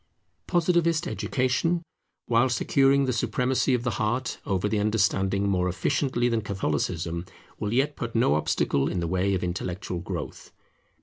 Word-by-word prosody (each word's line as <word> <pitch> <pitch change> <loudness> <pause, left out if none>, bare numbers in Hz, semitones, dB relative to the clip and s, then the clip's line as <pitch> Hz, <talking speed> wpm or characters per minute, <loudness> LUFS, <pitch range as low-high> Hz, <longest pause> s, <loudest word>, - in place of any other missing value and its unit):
Positivist 170 -2 +2
education, 155 +7 0 0.4
while 120 +2 +3
securing 135 +2 +3
the 130 - 0
supremacy 125 +2 +1
of 120 - -2
the 120 - 0
heart 120 +4 -1
over 95 +1 0
the 105 0 0
understanding 100 -2 +1
more 90 -2 +1
efficiently 120 +7 0
than 115 -2 +1
Catholicism, 85 -3 -2 0.4
will 105 -1 -2
yet 135 +5 +1
put 120 -1 -5
no 115 -10 +3
obstacle 70 -2 +1
in 90 - -2
the 85 - -1
way 95 +3 +1
of 90 - -2
intellectual 90 0 -3
growth. - - -6
110 Hz, 145 wpm, -26 LUFS, 95-130 Hz, 0.4 s, while